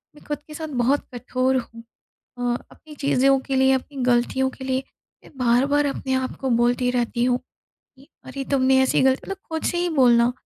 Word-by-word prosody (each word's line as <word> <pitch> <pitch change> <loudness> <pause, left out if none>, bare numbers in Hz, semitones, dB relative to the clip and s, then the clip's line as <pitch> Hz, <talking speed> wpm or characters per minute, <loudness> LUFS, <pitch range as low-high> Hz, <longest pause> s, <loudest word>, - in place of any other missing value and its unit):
मैं - - -17
ख़ुद 295 -1 -3
के 305 - -10
साथ 315 +1 -5 0.2
बहुत 275 +4 +1
कठोर 255 +2 0
हूँ 230 -2 -7 0.5
अ, - - -7 0.3
अपनी 305 -1 -14
चीज़ों 275 -1 +2
के 270 - -2
लिए 265 0 +4
अपनी 270 +2 -3
गलतियों 250 +2 +2
के 265 - -11
लिए, 260 0 -1 0.4
मैं - - -16
बार-बार 265 +4 +2
अपने 265 -1 -3
आप 260 0 -1
को 265 - -1
बोलती 245 +1 +2
रहती 240 -1 -1
हूँ 250 0 +1 0.4
कि 270 +1 -24 0.2
अरे 270 +1 -5
तुमने 265 0 +4
ऐसी 265 - +2
गल 265 0 +5
मतलब 390 +8 -6
ख़ुद 320 -3 -6
से 345 - 0
ही 350 0 0
बोलना, 245 -5 +4
265 Hz, 195 wpm, -23 LUFS, 250-275 Hz, 0.5 s, गल